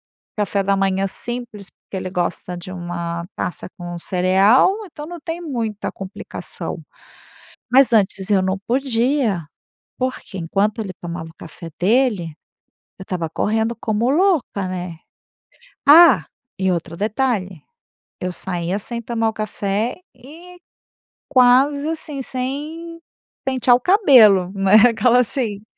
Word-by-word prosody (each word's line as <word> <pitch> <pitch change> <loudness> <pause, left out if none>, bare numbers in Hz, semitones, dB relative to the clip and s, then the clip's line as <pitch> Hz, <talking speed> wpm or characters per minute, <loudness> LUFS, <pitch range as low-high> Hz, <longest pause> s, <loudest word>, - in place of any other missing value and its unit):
um - - -16
café 200 -1 0
da 195 0 +1
manhã 195 0 +1
simples, 235 -2 -5
porque 195 - -10
ele 185 -1 -5
gosta 180 0 -3
de 175 +1 -9
uma 170 -1 -5
taça - - -4
com 175 -1 -6
cereal, 190 - +3
então 300 -5 -9
não 345 0 -8
tem 330 +2 -5
muita 230 -9 -3
complicação. 195 0 -7 0.9
Mas 260 0 +5
antes 195 -2 +2
eu 195 -2 +4
não 190 +1 0
podia. 240 - 0 0.5
Porque 255 -6 -4
enquanto 195 +6 0
ele 200 -4 -4
tomava 170 -1 -6
o 160 - -20
café 165 +1 -11
dele, 215 -1 +2 0.7
eu - - -9
estava 180 -3 -3
correndo 220 +7 -1
como 220 +1 -1
louca, 300 - +1
né? 180 -2 -5 0.9
Ah! 290 - +8 0.3
E 190 -1 +1
outro 170 -1 -4
detalhe: 205 - -2 0.6
eu 180 0 -3
saía 175 +1 -3
sem 235 +3 -5
tomar 225 -1 -1
o - - -5
café 215 +1 -2 0.2
e 335 +8 -14 0.7
quase, 270 +4 +4
assim, 305 -3 -4
sem 300 +7 -5 0.5
pentear 255 -2 +3
o - - -4
cabelo, 245 - +5
né? 195 +1 +4
Aquela 235 +2 +3
assim 220 -4 -2
215 Hz, 130 wpm, -20 LUFS, 185-260 Hz, 0.9 s, Ah